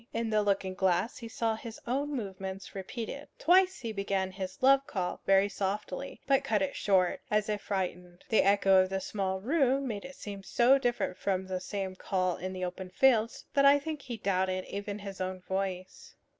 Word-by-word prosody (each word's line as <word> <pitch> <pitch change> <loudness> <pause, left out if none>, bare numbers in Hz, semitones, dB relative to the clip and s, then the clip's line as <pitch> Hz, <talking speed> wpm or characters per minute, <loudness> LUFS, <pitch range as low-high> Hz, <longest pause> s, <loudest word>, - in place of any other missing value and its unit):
In 230 -1 -1
the 215 0 +3
looking 195 -2 0
glass 185 +3 +1
he 230 - -7
saw 225 0 -1
his 225 0 -8
own 275 +4 -1
movements 195 -4 -5
repeated. 230 +8 -6
Twice 370 +2 +4
he 230 -3 -3
began 195 -2 -1
his 190 +2 -7
love 275 +1 +5
call 180 -3 -3
very 195 +1 +5
softly, 205 +4 -4
but 275 -1 +3
cut 210 -3 +1
it 190 - -2
short, 185 -3 +2
as 210 0 +1
if 210 -1 -1
frightened. 180 -2 -4
The 220 - +5
echo 195 -1 +5
of 185 - 0
the 190 0 -1
small 190 -1 -2
room 270 +1 +2
made 210 -4 -4
it 275 0 -9
seem 200 -1 -7
so 245 +7 +4
different 240 -7 -1
from 190 -1 -1
the 185 -1 -3
same 190 0 -4
call 185 -1 -1
in 185 +2 -4
the 185 -1 -3
open 185 +1 -6
fields 230 +2 +2
that 280 - +4
I 280 +1 +7
think 300 0 -5
he 245 -3 -6
doubted 185 -2 0
even 200 0 -5
his 195 -2 -7
own 185 0 -3
voice. 190 - -4
200 Hz, 195 wpm, -30 LUFS, 190-235 Hz, -, I